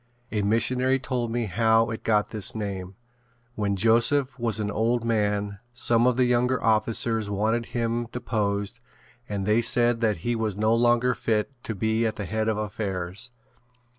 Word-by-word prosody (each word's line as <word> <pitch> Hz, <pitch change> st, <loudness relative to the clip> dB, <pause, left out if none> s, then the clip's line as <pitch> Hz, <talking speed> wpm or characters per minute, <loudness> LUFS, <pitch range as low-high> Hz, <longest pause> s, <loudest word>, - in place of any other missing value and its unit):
A 105 Hz, -, 0 dB
missionary 125 Hz, +5 st, +2 dB
told 125 Hz, -2 st, -3 dB
me 120 Hz, 0 st, -1 dB
how 110 Hz, +3 st, +2 dB
it 110 Hz, -, -5 dB
got 105 Hz, -2 st, +1 dB
this 105 Hz, -2 st, -1 dB
name. 100 Hz, -3 st, -5 dB, 0.6 s
When 100 Hz, -3 st, -1 dB
Joseph 120 Hz, +6 st, +2 dB
was 115 Hz, -2 st, +1 dB
an 105 Hz, -1 st, -2 dB
old 115 Hz, +2 st, 0 dB
man 105 Hz, -3 st, 0 dB, 0.2 s
some 120 Hz, 0 st, +3 dB
of 125 Hz, -1 st, +2 dB
the 130 Hz, -, +4 dB
younger 125 Hz, +1 st, +2 dB
officers 110 Hz, 0 st, +1 dB
wanted 110 Hz, +3 st, 0 dB
him 115 Hz, 0 st, -2 dB
deposed 105 Hz, -3 st, -2 dB, 0.5 s
and 100 Hz, -2 st, -3 dB
they 105 Hz, +3 st, +3 dB
said 120 Hz, 0 st, +1 dB
that 110 Hz, -4 st, +1 dB
he 120 Hz, 0 st, +1 dB
was 110 Hz, -3 st, -2 dB
no 110 Hz, +1 st, +2 dB
longer 120 Hz, +1 st, +3 dB
fit 110 Hz, +3 st, -1 dB
to 110 Hz, -, -4 dB
be 110 Hz, +3 st, +1 dB
at 110 Hz, -, -3 dB
the 105 Hz, -, -5 dB
head 110 Hz, +5 st, -2 dB
of 110 Hz, -1 st, 0 dB
affairs. 100 Hz, 0 st, -4 dB
110 Hz, 165 wpm, -25 LUFS, 105-120 Hz, 0.6 s, the